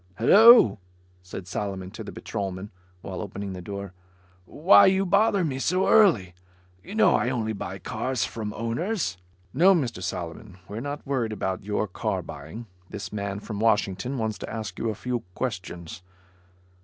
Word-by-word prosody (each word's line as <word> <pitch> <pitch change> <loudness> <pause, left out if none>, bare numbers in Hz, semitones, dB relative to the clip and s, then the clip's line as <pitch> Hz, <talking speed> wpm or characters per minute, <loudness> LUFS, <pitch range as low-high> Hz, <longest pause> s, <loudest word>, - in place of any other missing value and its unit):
"Hello," 200 - +7 0.4
said 90 0 -9
Solomon 95 -1 -4
to 110 +1 -8
the 105 - -8
patrolman, 100 -1 -5 0.3
while 95 -1 -6
opening 100 -1 -6
the 90 - -7
door. 100 0 -7 0.5
"Why 165 - +6
you 190 +1 +3
bother 200 +1 +3
me 135 -4 -3
so 185 +7 +1
early? 150 - +4 0.5
You 200 - -8
know 220 0 +5
I 120 - +1
only 110 -4 -1
buy 100 - -6
cars 130 -2 -2
from 110 -2 -5
owners." 115 - -2 0.4
"No, 185 +7 +6
Mr. 125 - -2
Solomon, 90 +2 -6
we're 105 +2 -6
not 145 +3 -5
worried 130 -5 -1
about 95 -2 -3
your 105 +1 -1
car 90 - -3
buying. 80 +12 -9 0.2
This 105 - -7
man, 100 -1 -3
from 105 -1 -6
Washington, 110 +2 +1
wants 110 -2 -2
to - - -6
ask 110 -2 -6
you 115 - -1
a 110 - -3
few 125 +3 -3 0.2
questions." 90 -8 -5
110 Hz, 160 wpm, -26 LUFS, 95-135 Hz, 0.5 s, Hello